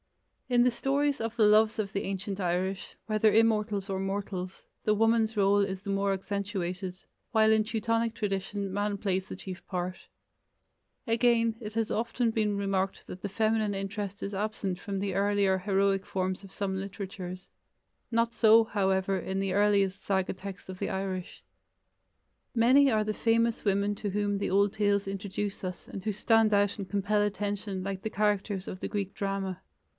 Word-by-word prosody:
In 245 -1 +5
the 250 - +4
stories 280 +3 0
of 225 0 -3
the 225 - +4
loves 215 +1 +5
of 200 -2 -2
the 200 - 0
ancient 195 +1 -3
Irish, 185 +2 -2
whether 215 0 +3
immortals 215 -3 +2
or 190 -1 -1
mortals, 195 -1 -4 0.2
the 215 - +3
woman's 225 0 +2
role 200 0 +4
is 195 -1 -1
the 200 - -3
more 195 0 +1
accentuated, 190 -2 -3 0.3
while 220 -2 +5
in 220 0 +4
Teutonic 230 +1 0
tradition 195 -1 -2
man 205 0 -1
plays 190 -1 -1
the - - -6
chief 185 -1 -8
part. 180 0 -3 1.1
Again, 230 -1 +3
it 210 -1 -7
has 225 -1 0
often 230 +1 0
been 210 -2 0
remarked 195 -1 -1
that 180 - -8
the 205 - -3
feminine 215 0 +1
interest 200 0 -4
is 200 - -4
absent 195 -2 -2
from 200 -2 -4
the 195 -1 -2
earlier 200 -1 +2
heroic 195 0 +1
forms 185 0 -2
of 195 - -12
some 195 -1 -2
literatures. 190 -1 -6 0.6
Not 230 0 +1
so, 225 0 +6
however, 195 -2 +1
in 190 +2 -3
the 195 -1 -1
earliest 200 -1 +2
saga 190 -1 0
texts 190 0 -9
of 185 -1 -8
the - - -2
Irish. 190 -2 -4 1.1
Many 260 +4 +5
are 215 -1 +2
the 215 0 -1
famous 230 +1 +1
women 200 0 +1
to 205 0 -3
whom 205 0 0
the - - -1
old 200 +1 +3
tales 205 -2 +1
introduce 195 +1 -4
us 180 -1 -5
and 195 - -7
who 215 - 0
stand 220 +1 +3
out 205 0 +3
and 195 -3 -6
compel 205 +2 +1
attention 205 -1 -2
like 195 0 -4
the 220 - -3
characters 205 -2 0
of 185 - -6
the - - -3
Greek 200 -1 -3
drama. 195 -2 -3
200 Hz, 175 wpm, -29 LUFS, 195-215 Hz, 1.1 s, so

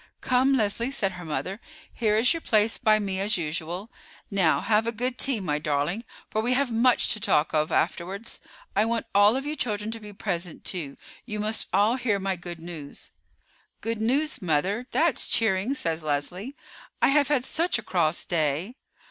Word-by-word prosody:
"Come, 260 +2 +3
Leslie," 225 +2 0
said 200 -8 0
her 180 -2 -9
mother, 160 +7 -3 0.3
"here 215 -3 +1
is 240 +7 +4
your 330 - -4
place 215 -3 +2
by 215 -3 +4
me 195 -3 -2
as 205 +2 +1
usual. 170 +5 -4 0.4
Now, 185 -5 +3
have 220 +1 +2
a - - +1
good 250 +2 -2
tea, 265 -5 +1
my 150 -6 -1
darling, 150 +9 -1 0.3
for 215 - 0
we 245 +3 +2
have 265 -1 +1
much 235 +2 +3
to 215 - -5
talk 180 -8 +2
of 155 0 +1
afterwards. 195 +6 -2 0.3
I 210 - +4
want 230 +1 -1
all 205 +3 +6
of 270 +1 -2
you 300 +1 -2
children 210 -5 -2
to 225 - -6
be 210 -1 -10
present 180 -5 -4
too; 155 -7 -3 0.3
you 210 -2 -3
must 215 +1 -1
all 210 +6 +3
hear 230 -5 +1
my 195 -1 -1
good 175 -1 -8
news." 160 -4 -8 0.7
"Good 225 -1 -3
news, 280 +7 +1
mother. 185 +8 0
That's 330 -3 +2
cheering," 220 +3 +2
said 165 - -2
Leslie. 175 - -3 0.4
"I - - +4
have 285 0 +4
had 270 -3 +1
such 335 +2 0
a 240 - -6
cross 170 -3 +1
day." 165 - -1
210 Hz, 185 wpm, -26 LUFS, 175-240 Hz, 0.7 s, all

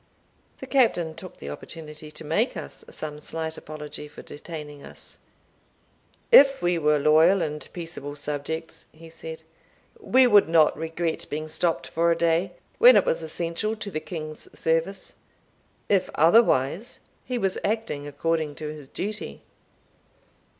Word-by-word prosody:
The - - -8
Captain 220 - +2
took 175 +3 -11
the 70 - -7
opportunity 155 - -9
to 155 - -10
make 165 - 0
us - - -6
some 150 -1 -6
slight 160 +1 -5
apology 150 -1 -8
for 150 - -12
detaining 150 -2 -9
us. - - -13 1.1
"If 275 - +8
we 175 -1 +1
were 150 -1 +3
loyal 160 +6 +5
and 150 0 -4
peaceable 165 -4 -7
subjects," 150 +3 -5
he 165 +1 -14
said, 160 0 -9 0.6
"we 260 - +4
would 205 -8 +5
not 160 -2 +5
regret 160 +1 -3
being 155 +1 -4
stopt 165 +2 0
for 170 +1 +1
a 170 - +4
day, 170 +2 +1 0.3
when - - +9
it - - +4
was 165 - 0
essential 170 +6 -2
to 210 -2 -6
the 155 - -2
king's 155 -2 -7
service; 165 +4 -1 0.7
if 195 -3 +2
otherwise, 170 - +3 0.2
he 250 - -3
was 195 -5 0
acting 210 -10 -2
according 155 +1 -1
to 155 -1 -5
his 150 -3 -11
duty." 210 +8 -5
160 Hz, 145 wpm, -25 LUFS, 150-185 Hz, 1.1 s, when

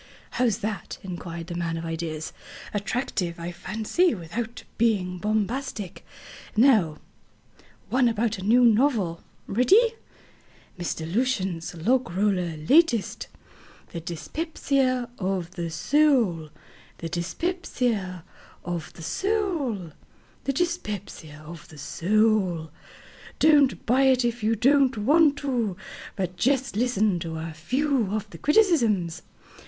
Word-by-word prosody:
"How's 235 -5 +1
that?" 215 -2 -4
inquired 170 -2 -6
the 175 - -6
man 170 -1 -2
of 165 - -5
ideas. 165 -1 -4 0.4
"Attractive, 200 -5 -2
I 170 +1 -4
fancy, 225 - 0
without 220 +7 -5 0.2
being 190 -6 +1
bombastic. 215 0 -2 0.5
Now, 215 - +4 0.9
one 255 0 +4
about 225 -1 -1
a - - -6
new 240 +5 +5
novel. 220 -8 +2 0.2
Ready?" 400 - +4 0.9
MR. 165 -1 -4
LUCIEN 195 -8 0 0.2
LOGROLLER'S 185 -9 0
LATEST 295 - +3 0.6
The 170 - -5
Dyspepsia 255 - -1
of 185 -3 -2
the 170 -3 -4
Soul 210 - +2 0.5
The 165 - -5
Dyspepsia 200 - -2 0.4
of 175 -2 -4
the 165 - -11
Soul 320 - -1 0.5
The 275 - 0
Dyspepsia 205 - -4
of 165 0 -10
the 155 - -14
Soul 185 -1 +1 0.7
Don't 290 -4 +4
buy 260 +4 +4
it 255 -2 +4
if 240 0 -1
you 220 +2 +2
don't 270 +2 +3
want 290 +6 +4
to, 235 -10 -1 0.4
but 180 -2 -3
just 270 -1 +1
listen 215 -5 +1
to 165 -2 -5
a 160 0 -5
few 255 - 0
of 210 0 -2
the - - -10
criticisms. 230 - +2
215 Hz, 115 wpm, -25 LUFS, 175-260 Hz, 0.9 s, new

